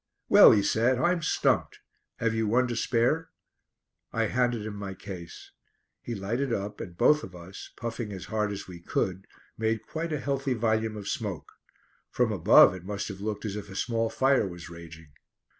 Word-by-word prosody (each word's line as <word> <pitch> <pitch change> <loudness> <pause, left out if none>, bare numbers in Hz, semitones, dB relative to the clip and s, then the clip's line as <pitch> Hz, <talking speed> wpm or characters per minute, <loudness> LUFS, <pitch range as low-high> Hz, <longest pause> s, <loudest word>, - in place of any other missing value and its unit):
"Well," - - +9
he 100 - +3
said, 120 +5 +2
"I'm 175 +7 +1
stumped. - - +1 0.4
Have 115 -1 0
you 110 -1 0
one 125 +4 +3
to 120 - -2
spare?" 125 +8 +1 0.8
I 115 - 0
handed 120 -1 0
him 110 - -5
my 100 -2 -6
case. 90 -4 -9 0.5
He 120 - -5
lighted 115 +7 -2
up 105 -1 -3
and 85 -1 -8
both 150 +8 +4
of 90 - -9
us, 90 +3 -10
puffing 115 -2 -4
as 95 -3 -7
hard 105 -1 -1
as 100 - -6
we 90 -2 -9
could, 95 +2 -2 0.3
made 110 0 -1
quite 165 +1 -4
a 150 - -1
healthy 135 -1 -1
volume 110 -1 0
of 100 -1 -7
smoke. 100 -8 -4 0.6
From - - +1
above - - +7
it 90 -2 -9
must 100 +2 -4
have 100 -1 -8
looked 105 +1 -4
as 105 -2 -3
if 105 -1 -7
a 95 - -9
small 115 +2 0
fire 135 -4 +2
was 85 -1 -9
raging. 80 -2 -12
110 Hz, 185 wpm, -28 LUFS, 95-120 Hz, 0.8 s, Well